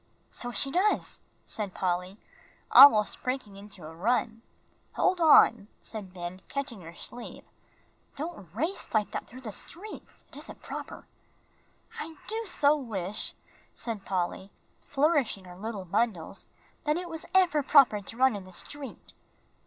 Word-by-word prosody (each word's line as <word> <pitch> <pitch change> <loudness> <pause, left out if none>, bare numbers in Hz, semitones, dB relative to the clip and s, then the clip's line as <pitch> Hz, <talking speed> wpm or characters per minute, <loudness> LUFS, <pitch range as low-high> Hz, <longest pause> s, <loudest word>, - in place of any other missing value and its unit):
"So 245 - -4
she 275 +3 +1
does," 380 +7 +1 0.3
said 205 -4 -3
Polly, 180 +1 -1 0.5
almost 220 -7 +8
breaking 255 -6 -3
into 195 -4 -11
a 160 - -9
run. 225 +5 0 0.5
"Hold 370 -1 +2
on," 235 -9 +6
said 210 -4 -7
Ben, 180 0 -6
catching 270 -7 -4
her 165 0 -11
sleeve, 245 +6 -8 0.7
"don't 300 - -6
race 320 - -2
like 210 -1 +2
that - - -4
through 255 +3 -11
the 225 -4 -6
streets; 385 - -9
it - - -15
isn't - - -10
proper." - - -7 0.9
"I 320 +1 -6
do 450 +1 -3
so 295 -4 +3
wish," 210 -8 -2 0.4
said 225 -4 -3
Polly, 190 0 -2 0.3
flourishing 280 - +1
her 180 -1 -11
little 205 0 -5
bundles, 195 -2 -2 0.4
"that 300 +1 +2
it 360 0 -4
was 325 -2 -7
ever 355 -5 +4
proper 270 -7 +5
to 225 +3 -8
run 260 -2 +4
in 195 -2 -7
the 185 - -13
street." 275 +9 -6
230 Hz, 145 wpm, -29 LUFS, 195-290 Hz, 0.9 s, almost